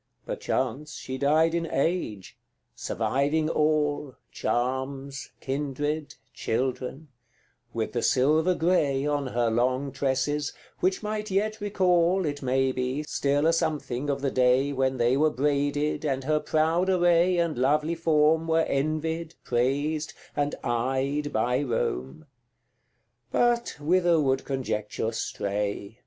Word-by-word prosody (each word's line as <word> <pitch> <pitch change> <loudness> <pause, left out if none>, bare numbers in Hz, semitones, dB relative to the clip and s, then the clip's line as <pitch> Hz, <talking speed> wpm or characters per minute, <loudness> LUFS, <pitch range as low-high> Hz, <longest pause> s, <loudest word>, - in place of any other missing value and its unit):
CIII. - - -46
Perchance 135 +4 -2
she 130 0 -6
died 155 +4 +3
in 170 -1 -1
age 135 - -1 0.4
surviving 150 +4 0
all, 150 -2 +1 0.2
Charms, 135 +2 -2
kindred, 145 +2 -3 0.2
children 130 +5 -3 0.6
with - - -3
the - - 0
silver 155 +7 +3
grey 150 -6 +1
On 145 -2 0
her 120 -2 0
long 130 +4 +1
tresses, 140 +2 -1 0.3
which 185 +3 0
might 215 0 -3
yet 215 +3 0
recall, 185 -2 +2
It 145 -1 -3
may 130 0 +1
be, 130 +3 -2
still 145 0 0
a 165 - +4
something 150 -5 -1
of 140 -1 -1
the 140 -1 0
day 130 +2 +3
When 130 -1 0
they 120 +1 +3
were 155 +2 +4
braided, 145 +2 0
and 135 -3 -1
her 155 +2 +1
proud 160 +4 +1
array 175 0 +4
And 170 -3 +1
lovely 150 +6 +2
form 160 -1 +2
were 160 0 +3
envied, 155 +3 -2
praised, 145 +6 0 0.2
and 145 0 0
eyed 135 +4 -1
By 125 +4 +1
Rome 115 - -2 1.1
But 240 -1 +1
whither 175 +2 +3
would 135 -2 +1
Conjecture 115 -5 -2
stray? 100 0 -3
145 Hz, 125 wpm, -27 LUFS, 130-160 Hz, 1.1 s, a